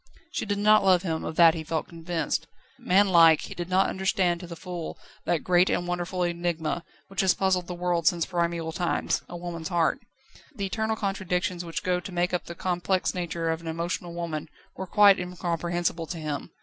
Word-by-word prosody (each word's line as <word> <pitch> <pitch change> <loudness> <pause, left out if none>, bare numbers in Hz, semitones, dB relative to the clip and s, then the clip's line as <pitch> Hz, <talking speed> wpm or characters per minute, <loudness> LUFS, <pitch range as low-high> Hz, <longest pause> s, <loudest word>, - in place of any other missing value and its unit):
She - - -3
did 205 0 0
not 215 0 +5
love 185 -2 +4
him, 160 -3 -2
of 160 - -4
that 165 -1 +7
he 160 -1 -5
felt 160 0 -2
convinced. 165 -2 -3 0.3
Man 200 +3 +4
like, 165 -3 +7
he - - -7
did 175 0 -5
not 185 +1 +3
understand 185 -2 +1
to 175 - -8
the 170 - -7
full 175 0 -6 0.3
that 170 - 0
great 180 0 +4
and 175 - 0
wonderful 180 +1 -2
enigma, 170 -1 -1 0.2
which 195 +1 -1
has 190 -1 +3
puzzled 185 -2 +1
the 180 - -5
world 175 -2 0
since 170 -1 +3
primeval 170 -2 -1
times: 175 +1 -1
a 175 - -6
woman's 170 -2 -5
heart. 170 -3 +1 0.6
The 200 - -2
eternal 220 +3 -1
contradictions 185 -3 -2
which 165 -1 -4
go 180 -1 +1
to 185 - -8
make 175 0 0
up 180 - -1
the 170 - -8
complex 180 +1 0
nature 170 -2 -2
of 160 0 -3
an 170 - -9
emotional 170 +1 -3
woman 165 -3 -4 0.3
were 190 - -5
quite 200 +1 +6
incomprehensible 175 -1 -2
to 175 - -5
him. 150 -3 -4
175 Hz, 200 wpm, -27 LUFS, 170-185 Hz, 0.6 s, that